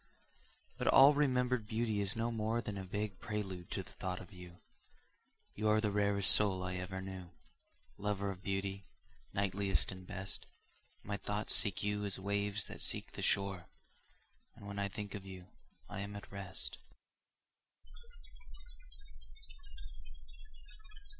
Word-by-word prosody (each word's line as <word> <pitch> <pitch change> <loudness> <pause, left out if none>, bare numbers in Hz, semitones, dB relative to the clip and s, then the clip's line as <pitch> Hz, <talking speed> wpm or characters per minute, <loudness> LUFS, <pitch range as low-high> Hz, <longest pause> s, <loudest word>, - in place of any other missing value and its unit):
But - - 0
all 135 +2 +9
remembered 125 -5 +2
beauty 110 -2 +1
is 100 +2 +2
no 115 +1 0
more 110 +1 0
Than 105 -3 -3
a 95 - -4
vague 100 0 -3
prelude 95 -4 -4
to - - -2
the - - -14
thought 90 -1 -3
of 105 - -11
you 90 -1 -10 1.0
You 110 +1 0
are 105 0 +5
the 105 -1 +1
rarest 100 -1 +3
soul 95 -3 +3
I 90 0 -2
ever 95 +1 -4
knew, 95 -2 -6 0.7
Lover 100 -1 0
of 95 -1 -8
beauty, 95 0 -2 0.4
knightliest 95 -3 +2
and 95 -1 -9
best; 95 -1 -2 0.6
My 100 0 -2
thoughts 105 +1 -1
seek 100 -1 +4
you 105 0 0
as 100 -2 -1
waves 100 0 0
that - - -6
seek - - +1
the - - -6
shore, 95 -3 +2 0.9
And - - -12
when 100 0 -4
I 100 - +1
think 100 0 -6
of 100 - -5
you, 95 -2 -9 0.4
I - - -5
am 100 +1 -4
at 100 - -8
rest. 95 -2 -5
100 Hz, 140 wpm, -36 LUFS, 95-105 Hz, 1.0 s, all